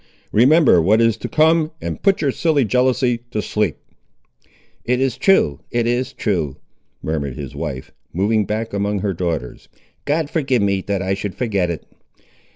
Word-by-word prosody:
Remember 130 - +5
what 105 +7 +3
is 115 -1 +3
to - - -5
come, 160 0 +3
and - - -5
put 195 -1 +2
your 140 -3 +1
silly 150 -3 +1
jealousy 125 0 +1
to 110 - -3
sleep." 105 - -1 1.1
"It 125 +1 0
is 135 -2 0
true, 130 - +3
it 120 -1 0
is 120 +2 0
true," 85 - -2 0.5
murmured 70 -5 -2
his - - -7
wife, 70 -5 -5 0.2
moving 105 +4 +1
back 110 +2 -3
among 100 0 -1
her 100 -1 -1
daughters; 80 -8 -4 0.4
"God 150 +1 0
forgive 135 -8 0
me, 100 -1 +1
that 100 -1 -1
I 95 +1 0
should 100 0 -4
forget 100 -8 0
it!" 85 - -5
110 Hz, 165 wpm, -20 LUFS, 95-130 Hz, 1.1 s, Remember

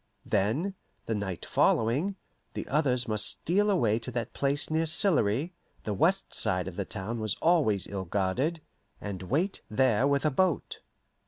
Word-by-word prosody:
Then, 115 - 0 0.3
the 115 - -1
night 100 -4 -4
following, 140 - +2 0.4
the - - -4
others 130 -4 +1
must 110 -1 +1
steal 205 +5 +1
away 115 - +2
to 115 - -6
that 120 -2 -4
place 140 +2 0
near 160 +1 +1
Sillery 155 - +1 0.3
the 105 - -2
west 185 - +1
side 90 -1 +1
of 95 - -6
the 100 - -3
town 110 +5 -4
was 110 -2 0
always 145 - +2
ill 95 -2 -5
guarded 105 - -1 0.4
and 100 -3 -6
wait 155 - -1
there 125 +2 +3
with 140 +1 +1
a 155 - +3
boat. 175 +3 0
125 Hz, 160 wpm, -29 LUFS, 105-160 Hz, 0.4 s, there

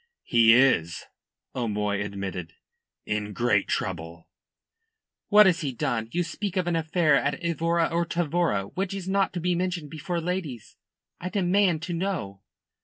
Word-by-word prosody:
"He 115 -1 +5
is," 105 -11 +2 0.5
O'Moy 105 -4 -1
admitted. 95 -4 -6 0.5
"In 105 0 -3
great 120 -3 +1
trouble." 85 -3 -4 1.0
"What 210 0 +7
has 185 -1 +3
he 145 -4 -2
done? 115 -1 -2
You 175 +1 0
spoke 190 +3 -4
of 185 - +1
an 175 -1 0
affair 160 -2 +2
at 140 +1 +1
Evora 170 0 +1
or 170 0 0
Tavora, 170 - 0
which 195 +1 -2
is 190 -2 -6
not 195 0 +1
to 180 - -3
be 180 +1 0
mentioned 175 -4 -2
before 170 +3 -3
ladies. 165 - -4 0.4
I 180 - -4
demand 185 -3 +2
to 175 0 -4
know." 165 - -3
165 Hz, 150 wpm, -26 LUFS, 105-180 Hz, 1.0 s, What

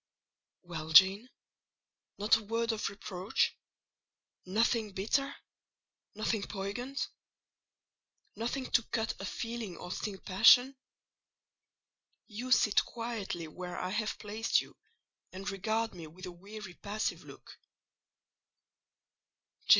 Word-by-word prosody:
"Well, 160 -3 -6
Jane! 195 +8 +7 0.9
not 210 +2 +5
a 225 - -1
word 230 +2 0
of 220 - -1
reproach? 195 0 -1 0.9
Nothing 220 +1 +1
bitter—nothing 215 -1 -3
poignant? 220 +7 -3 1.3
Nothing 240 +5 -2
to 240 - +5
cut 225 0 -2
a - - -3
feeling 230 -3 -4
or 180 - -7
sting 205 +1 -3
a - - -15
passion? 245 +7 +6 1.5
You 245 +4 -6
sit 210 -4 +5
quietly 225 -8 -4
where 180 +3 -7
I 180 - -2
have 215 +2 -1
placed 215 +2 +1
you, - - -8 0.6
and 190 +2 -7
regard 220 +4 -1
me 170 -3 -8
with 180 +5 -10
a 180 - -6
weary, 195 +2 -9
passive 210 +4 -3
look. - - -13
210 Hz, 105 wpm, -32 LUFS, 190-230 Hz, 1.5 s, Jane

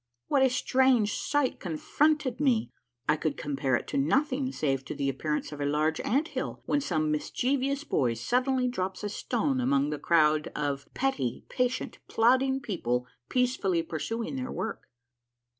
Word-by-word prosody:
What 280 - +3
a 265 - +5
strange 255 -4 +3
sight 290 -3 0
confronted 270 - 0
me 255 -6 +2 0.4
I 150 - +5
I - - -1
could 150 -2 -2
compare 140 -3 0
it - - -2
to - - 0
nothing 260 - +1
save 135 - -1
to - - -5
the 140 -1 0
appearance 150 +4 -2
of 145 -1 -6
a - - 0
large 155 +2 +1
ant 280 +8 +1
hill - - -4
when 290 - +1
some 155 - 0
mischievous 270 - 0
boy 125 - +1
suddenly 250 - +1
drops 190 -5 -3
a 205 - -1
stone 255 +5 -1
among 140 - +2
the 150 - -3
crowd 155 -2 +3
of 140 -2 -3
petty, 145 - -1
patient, 250 0 -1
plodding 260 +3 +3
people 125 - -1 0.2
peacefully 245 -9 +1
pursuing 225 - -3
their 255 -1 -4
work. 225 - -4
220 Hz, 160 wpm, -29 LUFS, -, 0.4 s, a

